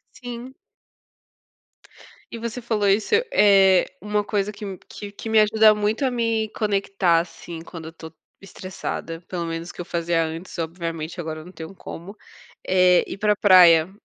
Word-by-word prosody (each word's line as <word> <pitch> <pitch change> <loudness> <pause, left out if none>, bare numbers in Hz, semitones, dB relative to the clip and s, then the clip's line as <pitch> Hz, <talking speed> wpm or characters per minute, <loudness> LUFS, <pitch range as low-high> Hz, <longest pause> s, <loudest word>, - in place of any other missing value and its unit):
Sim. 245 +1 -8 1.8
E 230 - -6
você 235 +2 -5
falou 215 -3 0
isso, 210 - +2 0.2
eh, 195 - +5 0.2
uma 210 +1 -1
coisa 205 -1 -1
que 210 +1 -10
m 195 -2 -6
que 205 -1 -9
que 225 - -8
me 220 0 +3
ajuda 215 0 +5
muito 210 +5 -1
a 260 - +2
me 230 -2 -1
conectar, 195 -5 +1
assim, 165 -1 -8
quando 165 -1 -10
eu - - -11
tô 160 -1 -11 0.3
estressada, 185 -3 -7
pelo 175 -2 -4
menos 165 +1 -5
que - - -11
eu - - -4
fazia 170 -1 -1
antes, 165 +3 -7
obviamente, 165 0 -5
agora 155 -1 -6
não 180 - -13
tenho 165 +2 -9
como, 190 +3 -10 0.5
eh, 180 -1 +4
ir - - -7
pra 210 0 +2
praia 180 -4 +6
190 Hz, 160 wpm, -23 LUFS, 170-210 Hz, 1.8 s, praia